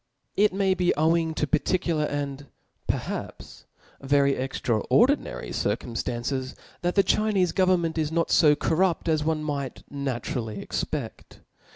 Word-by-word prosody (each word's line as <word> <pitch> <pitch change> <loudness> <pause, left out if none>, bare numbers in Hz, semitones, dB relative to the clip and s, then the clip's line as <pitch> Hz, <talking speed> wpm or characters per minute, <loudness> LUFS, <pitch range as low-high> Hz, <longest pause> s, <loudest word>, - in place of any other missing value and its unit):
It 210 +1 +4
may 190 0 +2
be 180 -1 +1
owing 160 +1 +2
to 150 - 0
particular, 165 0 0
and 145 -1 -4 0.4
perhaps - - -4 0.4
ver 140 +1 +3
y 140 - +3
extraordinary 135 - +1
circum 120 - -2
ftances; 125 +3 -3 0.3
that 175 0 -1
the 195 - +5
Chinefe 200 -5 +2
government 175 -3 +2
is 155 -1 -1
not 165 0 0
fo 150 -2 +6
cor 160 +2 -1
rupt 180 -2 +1
as 155 -2 +2
one 155 0 0
might 140 -3 -4
naturally 120 -5 -3
expedt. - - -5
155 Hz, 140 wpm, -26 LUFS, 140-175 Hz, 0.4 s, fo